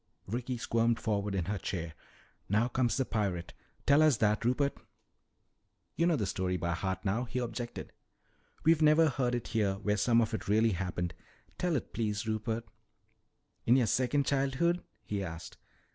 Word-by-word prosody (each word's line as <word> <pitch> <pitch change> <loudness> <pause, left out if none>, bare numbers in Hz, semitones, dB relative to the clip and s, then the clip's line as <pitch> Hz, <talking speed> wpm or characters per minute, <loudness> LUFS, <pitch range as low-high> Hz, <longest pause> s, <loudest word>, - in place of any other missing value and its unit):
Ricky 120 +4 -3
squirmed 115 0 +1
forward 105 -2 -1
in 90 -4 0
her 105 +2 -2
chair. 85 -5 -4 0.6
"Now 105 +4 +3
comes 125 -1 +1
the 135 - +1
pirate. 95 -7 -2 0.3
Tell 140 +2 +5
us 155 -6 +5
that, 105 0 +2
Rupert." 135 +4 +1 1.2
"You 170 - +2
know 170 - +3
the 110 -8 -1
story 90 -1 -1
by 85 0 -1
heart 95 +2 -3
now," 110 +6 0
he 125 - -5
objected. 120 -1 -4 0.7
"We 160 - +6
never 155 0 +5
heard 125 -2 0
it 120 - -4
here, 105 -4 +1
where 105 +1 -1
some 115 +3 +4
of 115 -1 +1
it 110 - -3
really 110 +2 +4
happened. 90 -2 -2 0.5
Tell 180 -3 +1
it, 130 - -3
please, 105 -1 -2
Rupert!" 110 +1 -1 1.0
"In 120 - +6
your 130 -3 +4
second 130 +5 +1
childhood?" 140 +6 +1 0.2
he 100 -1 -2
asked. 85 -2 -7
115 Hz, 165 wpm, -31 LUFS, 100-130 Hz, 1.2 s, We